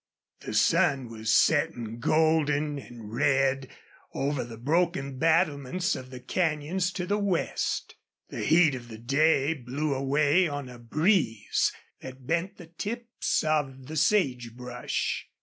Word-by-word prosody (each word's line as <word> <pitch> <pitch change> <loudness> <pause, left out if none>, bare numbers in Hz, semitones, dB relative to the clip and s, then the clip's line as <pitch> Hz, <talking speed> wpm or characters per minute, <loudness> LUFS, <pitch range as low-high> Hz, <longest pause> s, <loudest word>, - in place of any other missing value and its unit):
The - - -6
sun 135 -4 +3
was 110 -1 -2
setting 120 -5 +2
golden 150 0 +2
and 115 -4 -11
red 135 0 +2 0.5
over 140 -1 -1
the 115 -1 -9
broken 140 0 0
battlements 165 +1 +1
of 130 0 -8
the 130 -1 -9
canyons 170 +4 -1
to 180 - -3
the 205 +2 0
west. 195 -4 -1 0.4
The - - -5
heat 160 -1 +5
of 120 -2 -7
the 110 -2 -9
day 140 +5 +2
blew 140 +2 -3
away 145 +6 +2
on 145 -3 -5
a 125 -1 -11
breeze 150 - +1 0.3
that 130 0 -10
bent 170 +6 -1
the 175 - -11
tips 230 +8 -3
of 140 -4 -1
the 155 - -7
sage 135 - +1
brush. 125 0 -3
145 Hz, 135 wpm, -27 LUFS, 125-165 Hz, 0.5 s, heat